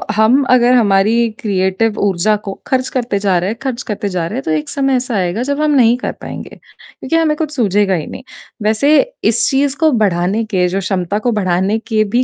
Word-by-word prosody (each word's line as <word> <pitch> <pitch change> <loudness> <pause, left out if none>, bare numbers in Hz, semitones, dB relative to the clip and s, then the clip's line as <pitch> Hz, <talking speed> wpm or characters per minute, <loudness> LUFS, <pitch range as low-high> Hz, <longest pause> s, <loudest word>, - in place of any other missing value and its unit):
हम 225 +6 +4
अगर 250 0 +4
हमारी 210 -2 +3 0.2
क्रिएटिव 205 0 0
ऊर्जा 200 +1 +1
को 195 - -3
खर्च 255 -1 0
करते 235 -5 -1
जा 195 -3 +1
रहे 180 +3 -2
हैं, 225 - -4
खर्च 260 -3 -3
करते 205 -1 -2
जा 180 -3 -2
रहे - - -5
हैं - - -4
तो 160 - -2
एक 155 -1 -2
समय 275 -1 0
ऐसा 250 -2 -2
आएगा 190 +4 -1
जब 285 +1 -1
हम 305 -1 +2
नहीं 240 -2 +4
कर - - -1
पाएँगे - - -7
क्योंकि 265 +5 -8
हमें 320 -2 +2
कुछ 310 -2 -3
सूझेगा 205 -4 +1
ही 160 -4 -2
नहीं। - - -9 0.4
वैसे 220 +8 +3 0.4
इस - - +1
चीज़ 275 0 +1
को 320 -1 +3
बढ़ाने 190 +3 0
के 180 -1 +2
जो 185 +2 -2
क्षमता 190 0 -2
को - - +3
बढ़ाने 190 +4 0
के 220 -2 +2
भी 250 - +4
215 Hz, 215 wpm, -15 LUFS, 190-255 Hz, 0.4 s, हम